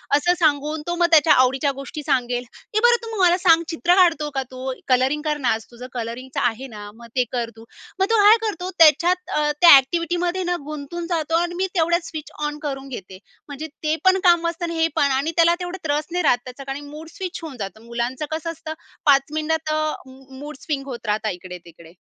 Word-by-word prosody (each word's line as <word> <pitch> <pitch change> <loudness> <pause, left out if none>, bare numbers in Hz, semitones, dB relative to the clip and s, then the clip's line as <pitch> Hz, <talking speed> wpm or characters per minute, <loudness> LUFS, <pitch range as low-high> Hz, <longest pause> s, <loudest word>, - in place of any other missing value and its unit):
असं 350 +5 +3
सांगून 300 -1 +1
तो 345 - -1
मग 345 0 +3
त्याच्या 315 0 +6
आवडीच्या 265 +2 +3
गोष्टी 295 +2 -7
सांगेल. 250 -3 0 0.3
"ए 430 - +4
बरं 475 -1 +4
तू 445 -4 -3
मला 355 0 +5
सांग 335 -3 +4
चित्र 345 +2 +2
काढतो 330 -5 +3
का 270 - 0
तू? 260 0 -5 0.2
कलरिंग 260 +4 +2
कर 300 -1 0
ना, 260 -4 0
आज 220 0 -5
तुझं 245 +2 -10
कलरिंगचं 245 +2 -5
आहे 255 +4 -8
ना, 205 0 -8
मग 235 0 -13
ते 250 - +3
कर 235 -2 -2
तू." 225 - -13 0.3
मग 385 - +4
तो 455 - +4
काय 430 +3 +8
करतो 365 -2 -4
त्याच्यात 340 +4 +4
अ, 295 0 +2
त्या 340 -5 +10
एक्टिविटीमध्ये 345 +6 -1
ना, 355 - +1
गुंतून 305 +3 -6
जातो 325 -2 -1
आणि 345 0 -3
मी 380 - +1
तेवढ्यात 340 0 +1
स्विच 310 -2 -8 0.2
ऑन 295 0 -6
करून 270 -1 -5
घेते. 190 -6 -9 0.3
म्हणजे 295 +2 -6 0.2
ते 310 +1 +1
पण 375 0 +5
काम 345 -2 +5
वाचतं 335 +1 -3
आणि 335 -1 -4
हे 325 - +4
पण. 280 -1 +2
आणि 275 +5 0
त्याला 340 +1 +5
तेवढं 355 +1 -5
त्रास 295 +1 -1
नाही 360 0 -1
राहत 245 - +4
त्याचा, 255 +2 -9
कारण 285 - -7
मूड 310 +2 -10
स्विच 375 -2 -5
होऊन 285 -6 -7
जातो. 200 +2 -6
मुलांचं 240 +4 -3
कसं 320 +1 -3
असतं 315 -1 -7 0.3
5 275 -2 +6
मिनिटात 310 0 -1
अ, 310 0 0 0.2
मूडस्विंग 270 +2 -7
होत 240 -3 -7
राहता 215 +1 0
इकडे-तिकडे. 175 -2 -10
300 Hz, 210 wpm, -22 LUFS, 260-340 Hz, 0.3 s, त्या